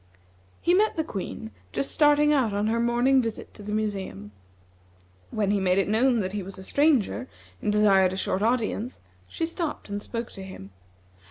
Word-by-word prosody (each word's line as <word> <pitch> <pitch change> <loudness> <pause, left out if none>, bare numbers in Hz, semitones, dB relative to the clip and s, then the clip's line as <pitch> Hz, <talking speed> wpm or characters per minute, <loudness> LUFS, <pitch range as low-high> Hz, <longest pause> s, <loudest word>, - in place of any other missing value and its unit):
He 350 - +3
met 420 +4 +3
the 320 - +1
Queen 185 - -6 0.2
just 140 +5 -2
starting 295 0 +4
out 250 -8 +2
on 205 +1 0
her 225 +2 +1
morning 240 +3 +3
visit 225 -2 -5
to - - -12
the 205 0 -6
museum. 195 - -3 1.0
When 205 -2 0
he 205 - +2
made 185 -1 +2
it 195 - +2
known 235 +2 +3
that 185 0 -3
he 205 - -2
was 195 +1 -8
a 190 - -9
stranger, 270 -1 +2 0.3
and 210 - 0
desired 195 -3 +4
a 190 - -4
short 190 0 -1
audience, 230 +1 -1 0.3
she 330 - -2
stopped 330 - -4
and 205 0 -3
spoke 230 +2 -5
to 195 - -9
him. 185 - -10
215 Hz, 185 wpm, -26 LUFS, 195-255 Hz, 1.0 s, starting